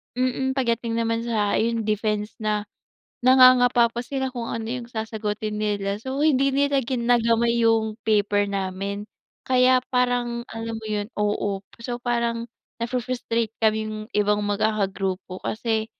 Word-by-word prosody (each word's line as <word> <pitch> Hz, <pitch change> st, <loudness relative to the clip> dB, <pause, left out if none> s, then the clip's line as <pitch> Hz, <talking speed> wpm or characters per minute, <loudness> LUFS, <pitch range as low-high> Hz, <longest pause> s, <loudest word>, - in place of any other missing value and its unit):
mm, 255 Hz, +1 st, 0 dB
pagdating 235 Hz, -3 st, 0 dB
naman 230 Hz, 0 st, 0 dB
sa 210 Hz, -3 st, +1 dB
ayon 230 Hz, 0 st, 0 dB
defense 210 Hz, 0 st, -1 dB
na, 210 Hz, -1 st, 0 dB, 0.6 s
nangangapa 255 Hz, -1 st, +6 dB
pa 235 Hz, -, -3 dB
sila 265 Hz, +1 st, -3 dB
kung 240 Hz, -2 st, -4 dB
ano 230 Hz, -1 st, -3 dB
yung 240 Hz, 0 st, -4 dB
sasagutin 215 Hz, -2 st, -3 dB
nila. 200 Hz, -2 st, -1 dB
So, 265 Hz, +4 st, -4 dB
hindi 275 Hz, -3 st, +3 dB
nila 280 Hz, 0 st, +3 dB
ginagamay 235 Hz, -1 st, +2 dB
yung 220 Hz, -1 st, +2 dB
paper 205 Hz, -2 st, +2 dB
namin. 195 Hz, +1 st, -3 dB, 0.4 s
Kaya 255 Hz, -1 st, +5 dB, 0.2 s
parang 245 Hz, -1 st, +1 dB
alam 225 Hz, 0 st, -4 dB
mo 220 Hz, -, -9 dB
yun 205 Hz, -1 st, -1 dB
oo. 205 Hz, -1 st, -1 dB, 0.2 s
So, 240 Hz, +1 st, -4 dB
parang 235 Hz, -1 st, -1 dB, 0.4 s
nafu-frustrate 235 Hz, -2 st, -2 dB
kaming 215 Hz, 0 st, 0 dB
ibang 210 Hz, 0 st, +2 dB
magkakagrupo. 195 Hz, -3 st, -1 dB
Kasi 220 Hz, -1 st, -1 dB
230 Hz, 130 wpm, -24 LUFS, 210-245 Hz, 0.6 s, nangangapa